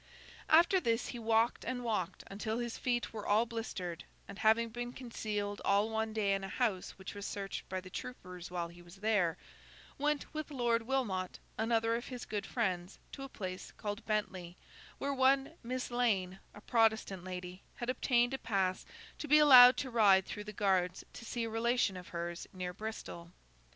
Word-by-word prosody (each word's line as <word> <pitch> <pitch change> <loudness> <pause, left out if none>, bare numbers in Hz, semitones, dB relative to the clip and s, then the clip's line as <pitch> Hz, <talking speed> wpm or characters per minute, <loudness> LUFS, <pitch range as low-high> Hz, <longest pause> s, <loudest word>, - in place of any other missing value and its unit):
After 340 +4 +6
this, 230 -7 0
he 240 - -5
walked 225 +1 +2
and 250 -1 -3
walked 190 -6 -2
until 215 +3 -3
his 240 -1 -3
feet 240 -2 -1
were 215 -2 -5
all 215 +3 +4
blistered; 190 -7 -5 0.2
and, 200 - -9
having 225 +1 +4
been 240 +2 -5
concealed 210 -5 -4
all 205 +3 +2
one 220 0 -1
day 210 -2 +1
in 195 0 -1
a - - -3
house 205 -5 -1
which 190 0 -8
was 205 - -7
searched 195 -1 -5
by 185 - -2
the 185 0 -12
troopers 180 -8 -7
while 175 -1 -3
he 175 +1 -14
was 175 +1 -14
there, 200 -5 +1 0.6
went 295 +1 -1
with 310 0 -4
Lord 240 -4 +1
Wilmot, 205 -9 -1 0.2
another 225 0 +1
of 240 - -4
his 250 -2 -6
good 205 -2 -3
friends, 185 -6 -2
to - - -8
a 270 - -6
place 185 -6 -6
called 205 -1 -4
Bentley, 185 -5 -2 0.4
where 280 0 -1
one 270 +1 +3
Miss 250 +1 -4
Lane, 195 -7 +1 0.2
a 210 - -11
Protestant 220 -5 +2
lady, 180 0 -6
had 240 +1 -2
obtained 245 -1 +2
a 265 - -2
pass 190 -4 -1 0.3
to 305 - -4
be 300 +1 +7
allowed 255 -4 +10
to 260 - -3
ride 200 -5 +5
through 210 - -6
the 210 - -6
guards 190 -3 +1
to 230 - -9
see 235 0 -2
a 230 - -2
relation 230 -2 +1
of 180 -1 -8
hers 170 0 -5
near 180 -1 -4
Bristol. 180 -4 -7
220 Hz, 185 wpm, -33 LUFS, 190-240 Hz, 0.6 s, allowed